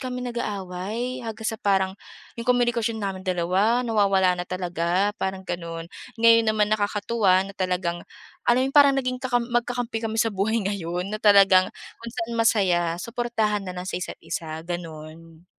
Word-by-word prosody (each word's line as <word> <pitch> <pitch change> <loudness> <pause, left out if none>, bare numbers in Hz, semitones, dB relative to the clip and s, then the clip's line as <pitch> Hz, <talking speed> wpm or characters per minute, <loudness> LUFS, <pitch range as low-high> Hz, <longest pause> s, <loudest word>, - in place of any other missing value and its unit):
kami 250 -1 -4
nag-aaway 210 +3 -4
hanggang 225 -2 -7
sa 220 -2 -5
parang 190 -2 +2 0.5
‘yong 230 - -6
komunikasyon 240 -2 +2
namin 195 -3 -4
dalawa 190 +6 +1
nawawala 195 -5 +3
na 180 0 -5
talaga, 180 +2 0
parang 190 0 -3
gano’n. 170 -2 -5 0.3
Ngayon 230 0 +5
naman, 215 -1 +2
nakakatuwa 205 -2 +2
na 200 - -9
talagang 180 -3 -2 0.5
alam 250 +2 +4
‘yong 270 - -3
parang 280 -1 +6
naging 255 -1 -2
kakam 245 -2 0
magkakampi 240 -1 -1
kami 220 - -4
sa 225 0 +2
buhay 205 +4 0
ngayon 185 0 -3
na 215 - -4
talagang 195 -3 +6 0.3
kung 230 0 -8
saan 230 +1 -3
masaya, 180 -7 +2
suportahan 225 0 -1
na 185 -2 -7
lang 180 - -5
sa 185 - -4
isa’t-isa, 160 -2 -6
gano’n. 165 -1 -8
200 Hz, 155 wpm, -24 LUFS, 180-230 Hz, 0.5 s, parang